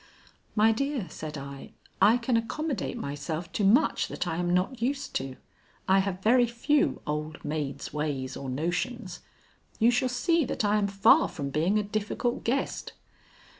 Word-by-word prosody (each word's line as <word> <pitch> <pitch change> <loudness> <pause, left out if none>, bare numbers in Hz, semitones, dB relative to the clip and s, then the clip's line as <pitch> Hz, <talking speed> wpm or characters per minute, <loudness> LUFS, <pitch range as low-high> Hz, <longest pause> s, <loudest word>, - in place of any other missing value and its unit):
"My 220 +1 +5
dear," 275 -1 -1
said 155 -1 -6
I, 140 0 -9 0.3
"I 215 +5 +6
can 240 0 0
accommodate 250 +2 -2
myself 155 0 -4
to 210 - -1
much 205 +6 +4
that - - -3
I 165 -2 -2
am 175 0 0
not 185 +7 0
used 275 +4 -2
to. 130 0 -5 0.5
I 190 0 +5
have 190 -1 -2
very 240 +2 +5
few 260 +6 +1
old 150 +1 -4
maid's 145 -3 -3
ways 140 -4 -2
or 135 - -6
notions. 175 - -2 0.6
You 235 +1 +5
shall 250 +1 +1
see 325 +7 +2
that 230 - -2
I 205 +1 +3
am 200 - +1
far 200 +10 +5
from 140 -5 -5
being 170 +8 +2
a 210 - +1
difficult 215 +3 -2
guest." 265 +4 -2
200 Hz, 165 wpm, -28 LUFS, 155-240 Hz, 0.6 s, I